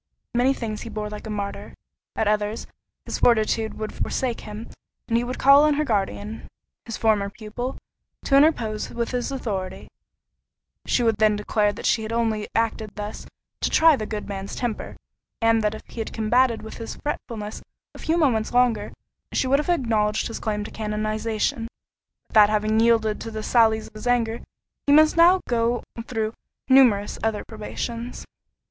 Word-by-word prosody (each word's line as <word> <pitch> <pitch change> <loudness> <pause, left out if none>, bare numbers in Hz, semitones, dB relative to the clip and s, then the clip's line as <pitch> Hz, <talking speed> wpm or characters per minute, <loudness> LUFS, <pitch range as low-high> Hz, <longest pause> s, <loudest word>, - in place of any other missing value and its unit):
Many 245 +3 +3
things 215 -4 -4
he 230 - -7
bore 210 -1 -4
like 210 +1 -7
a - - -6
martyr—at 205 +1 -5
others, 210 +1 0 0.4
his - - -4
fortitude 220 -1 +2
would 215 0 -5
forsake 250 -3 -2
him, 210 +2 -8 0.4
and 230 - 0
he 235 - +2
would 250 +1 -4
call 275 +2 +7
on 300 -1 +4
her 305 +1 0
guardian, 210 -1 -2 0.4
his 230 - -5
former 210 -3 +2
pupil, 220 +5 -6 0.5
to 275 - +3
interpose 240 -8 +3
with 235 -1 -3
his 250 +1 -2
authority: 195 -8 -4 1.0
she 245 - +2
would 225 -2 +2
then 215 -1 +4
declare 210 0 +1
that 205 - -8
she 220 -1 +1
only 230 -2 0
had 210 - -6
acted 220 -2 -1
thus 210 0 -6 0.3
"to - - 0
try 320 -1 +6
the 215 -5 -4
good 210 -1 -5
man's 195 -1 -5
temper, 240 -3 -4 0.4
and 225 -1 +3
that 210 0 0
if - - -10
he - - -10
had 225 - -3
combated 230 +2 +2
with 220 - -8
his 230 - -6
fretfulness 220 -7 -5 0.3
a - - -12
few 325 +2 0
moments 245 -9 +2
longer, 240 -4 +2 0.4
she - - +1
would 275 +2 +3
have 300 - -3
acknowledged 220 -9 +1
his 230 - -5
claim 210 -2 -2
to - - -8
canonization; 215 +1 -2 0.6
but - - -20
that 210 -1 +7
having 215 +1 +1
yielded 225 -2 +3
to - - -5
the 220 -1 -5
sallies 220 -2 +3
of - - -36
his 215 +3 -7
anger, 235 -2 +1 0.5
he - - +4
must 310 +1 +6
now 350 +2 +6
go 235 0 +1 0.2
through 220 -2 -2 0.3
numerous 245 -6 +4
other 220 -2 -1
probations." 230 +2 -6
225 Hz, 175 wpm, -24 LUFS, 215-245 Hz, 1.0 s, call